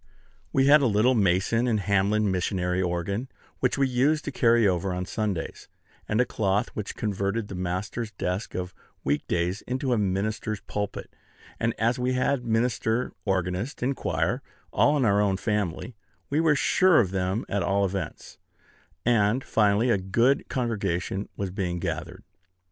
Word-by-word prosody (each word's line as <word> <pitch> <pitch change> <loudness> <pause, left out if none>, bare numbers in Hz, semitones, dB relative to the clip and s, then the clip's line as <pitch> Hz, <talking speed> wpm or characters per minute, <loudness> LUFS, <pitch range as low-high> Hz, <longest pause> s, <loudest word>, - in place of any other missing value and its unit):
We 135 - +3
had 145 +2 +7
a 135 - +3
little 110 +4 +3
Mason 105 +3 +2
and 110 -3 +2
Hamlin 100 +1 +2
missionary 90 0 0
organ, 95 +7 -2 0.3
which - - +1
we 135 -1 +3
used 140 +5 +1
to 145 - -3
carry 115 -4 +4
over 90 0 0
on 90 0 -3
Sundays, 100 -5 -3 0.4
and 110 - +1
a 125 - +4
cloth, 100 -2 0
which 105 -1 -6
converted 100 +1 -2
the - - -6
master's 95 +5 -3
desk 90 +2 -3
of 90 0 -4 0.3
week 70 +2 -1
days 90 +3 -1
into 130 +2 -2
the 120 - +2
minister's 105 +2 -1
pulpit; 105 -1 -5 0.4
and 115 0 0
as 115 +3 +1
we 125 +1 0
had 125 0 +1
minister, 115 +1 0
organist, 95 +6 -1
and 135 +2 +1
choir - - -1 0.3
all 150 +1 +4
in 135 - +2
our 100 -1 +3
own 100 -2 +1
family, 105 +2 -2 0.4
we 145 - +2
were 160 -2 +4
sure 180 +4 +4
of 95 -6 +1
them 95 +3 -1
at 100 - -1
all 100 +3 +2
events; 95 0 -5 0.7
and 115 +1 +3
finally 105 +3 +2
a 100 - +2
good 115 +9 +1
congregation 100 -6 -2
was 100 -2 -3
being 90 -2 -2
gathered. 85 +2 -4
105 Hz, 160 wpm, -26 LUFS, 95-120 Hz, 0.7 s, had